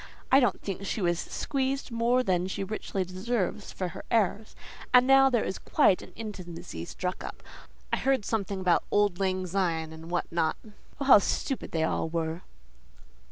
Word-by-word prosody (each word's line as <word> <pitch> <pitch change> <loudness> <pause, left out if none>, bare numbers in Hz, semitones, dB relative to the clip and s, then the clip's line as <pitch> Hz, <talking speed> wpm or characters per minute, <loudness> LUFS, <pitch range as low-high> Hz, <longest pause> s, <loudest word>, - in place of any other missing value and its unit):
I 270 - +8
don't 245 - +2
think 195 -1 -4
she - - -2
was 175 -3 +1
squeezed 270 -1 -2
more 235 +2 +2
than 185 -4 +1
she 190 - -3
richly 195 -1 -3
deserves 195 +2 -2
for 185 -2 -3
her 175 - -9
airs. 215 -1 0 0.4
And 250 0 +7
now 270 0 +6
there 240 -4 +2
is 190 - -3
quite 185 - +3
an - - -12
intimacy 175 - -7
struck 180 - -4
up: - - -8 0.5
I - - +4
heard 265 -5 +1
something 200 -3 -2
about 180 -2 +3
'auld 205 -3 +2
lang 185 -1 0
syne,' 170 -4 -1
and 160 +1 -10
what 175 0 0
not. 165 -1 +1 0.4
Oh, 280 - -2
how 265 - +9
stupid 260 +6 -2
they 160 -1 0
all 160 - 0
were!" 165 +1 -2
190 Hz, 175 wpm, -28 LUFS, 175-230 Hz, 0.5 s, how